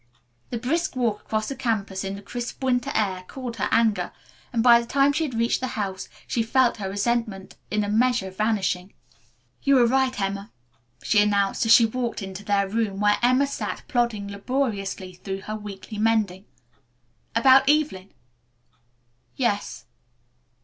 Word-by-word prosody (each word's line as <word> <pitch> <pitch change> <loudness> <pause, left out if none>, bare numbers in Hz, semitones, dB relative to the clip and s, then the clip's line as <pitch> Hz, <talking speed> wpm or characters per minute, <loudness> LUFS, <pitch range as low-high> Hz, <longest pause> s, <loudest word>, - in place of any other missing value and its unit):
The 240 - -3
brisk 295 +7 -1
walk 235 -5 0
across 215 -1 -2
the 275 - -4
campus 200 -6 -2
in 195 0 -4
the 200 - -10
crisp 240 +5 -6
winter 250 0 +1
air 190 -3 0
cooled 250 -3 -7
her - - 0
anger, 225 -2 +2 0.4
and 230 -2 +1
by 235 -1 +7
the 235 - -9
time 275 +2 +3
she 320 +2 0
had 260 -6 -5
reached 230 +1 +1
the 255 - -2
house 190 -2 -3 0.2
she 235 - -1
felt 245 +2 +2
her 195 -3 -4
resentment, 205 -1 -2
in 210 0 0
a - - -2
measure, 220 -2 +1
vanishing. 195 -2 -1 0.7
"You 275 - +3
were 245 -2 +6
right, 260 0 +1
Emma," 200 +2 -3 0.5
she 205 - +4
announced 205 +1 +1
as - - +3
she 230 - +8
walked 235 -1 -3
into 190 +1 -7
their 200 -1 +1
room 205 -1 -1
where 205 0 +3
Emma 255 +3 +4
sat 280 - -4
plodding 235 -5 0
laboriously 200 -3 -3
through 190 +2 -6
her 215 +2 -5
weekly 210 0 -8
mending. 210 -4 +1 0.9
"About 265 +3 +6
Evelyn?" 290 -11 +1 1.2
"Yes." 210 -6 -2
220 Hz, 160 wpm, -24 LUFS, 200-245 Hz, 1.2 s, she